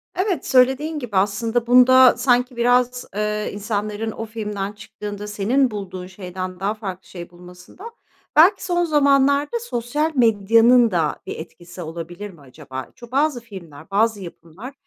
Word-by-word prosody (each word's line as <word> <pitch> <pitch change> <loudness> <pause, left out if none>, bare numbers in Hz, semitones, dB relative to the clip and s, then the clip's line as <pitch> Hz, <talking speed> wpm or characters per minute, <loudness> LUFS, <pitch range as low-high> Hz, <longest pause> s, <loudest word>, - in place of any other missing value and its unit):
Evet, 370 0 -1
söylediğin 265 +5 +2
gibi 235 -6 -7
aslında 225 +4 0
bunda 255 0 +6
sanki 250 0 +1
biraz, 245 +1 +1
eee, 210 0 -2
insanların 210 +1 -3
o 225 - -6
filmden 210 -3 -5
çıktığında 210 0 -8
senin 225 +6 +1
bulduğun 190 -3 -7
şeyden 185 -1 -7
daha 200 +2 -1
farklı 190 -5 -8
şey 175 -1 -9
bulmasında 180 - -13 0.4
belki 370 +5 +5
son 350 -1 +1
zamanlarda 285 - +2
sosyal 300 - -2
medyanın 230 +1 +4
da 165 -4 -1
bir - - -6
etkisi 175 +2 -11
olabilir 170 +4 -7
mi 170 -6 -17
acaba? 130 -1 -9
Çü 240 -2 -14
bazı 280 -2 +1
filmler, 185 -9 -12
bazı 215 +1 +1
yapımlar 180 - -11
220 Hz, 140 wpm, -21 LUFS, 190-255 Hz, 0.4 s, bunda